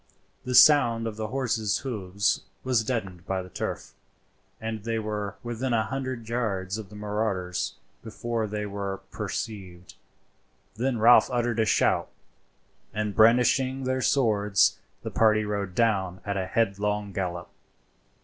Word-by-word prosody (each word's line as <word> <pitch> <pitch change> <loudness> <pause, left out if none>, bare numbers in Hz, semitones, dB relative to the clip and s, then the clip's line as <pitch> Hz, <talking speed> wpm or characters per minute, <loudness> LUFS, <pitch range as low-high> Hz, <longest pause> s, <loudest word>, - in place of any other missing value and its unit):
The 125 0 -1
sound 120 -4 +6
of 110 -2 -4
the 110 0 -3
horses' 115 -4 0
hoofs 100 -5 -1 0.2
was 125 -3 +2
deadened 100 -7 -4
by 95 -1 -1
the 90 - -12
turf, - - -5 0.7
and 110 -2 -5
they 115 0 -1
were 105 -2 -3
within 120 +2 -2
a 110 -1 +3
hundred 130 -1 -4
yards 105 -4 -2
of 105 -3 -8
the 105 - -12
marauders 105 -4 -2 0.3
before 115 0 -3
they 105 0 -3
were 100 -1 -4
perceived; 90 -5 -6 0.8
then 120 +4 -1
Ralph 115 +2 +6
uttered 120 -2 0
a 110 - +3
shout, - - +2 0.8
and 105 -1 -2
brandishing 125 +4 +4
their 130 0 -1
swords 105 -7 +2 0.2
the - - -4
party 110 -1 +3
rode 100 -3 -3
down 95 -5 +1
at 100 -1 -2
a 95 -1 -2
headlong 105 -1 -1
gallop. 90 -2 -4
110 Hz, 140 wpm, -26 LUFS, 100-120 Hz, 0.8 s, sound